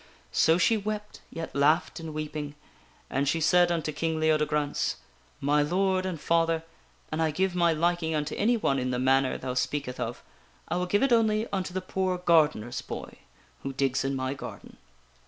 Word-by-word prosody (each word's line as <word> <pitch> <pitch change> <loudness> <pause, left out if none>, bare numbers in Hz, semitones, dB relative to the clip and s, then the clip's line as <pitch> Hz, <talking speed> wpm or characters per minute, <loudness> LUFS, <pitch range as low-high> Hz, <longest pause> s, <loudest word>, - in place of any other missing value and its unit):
So 160 +1 +4
she 220 +5 +3
wept, 210 0 -5
yet 165 0 -7
laughed 150 +5 +2
in 160 -1 -6
weeping. 150 -1 -5 0.5
And 140 +1 0
she 165 - +1
said 175 +2 +4
unto 160 -2 -1
King 160 +1 -2
Leodegrance: 150 -2 +1 0.2
" - - -34
My 150 0 +4
Lord 185 +4 +1
and 175 -4 -4
father, 165 0 +1 0.5
an 155 +1 -1
I 160 - +3
give 185 +4 0
my 170 -1 +3
liking 165 0 0
unto 150 -1 -2
any 235 +4 +2
one 135 -11 +1
in 130 0 -1
the 125 - -1
manner 130 +1 +2
thou 130 -1 -4
speaketh 125 0 -2
of, - - -4 0.4
I 170 - -1
will 180 0 -1
give 205 +5 +2
it 275 -3 +3
only 220 -1 +3
unto 190 -2 -1
the 185 +1 -3
poor 185 0 -1
gardener's 155 -9 +2
boy - - -8 0.4
who 135 - -4
digs 135 0 0
in 135 0 -1
my 130 0 -2
garden." 140 - -9
160 Hz, 185 wpm, -28 LUFS, 145-180 Hz, 0.5 s, So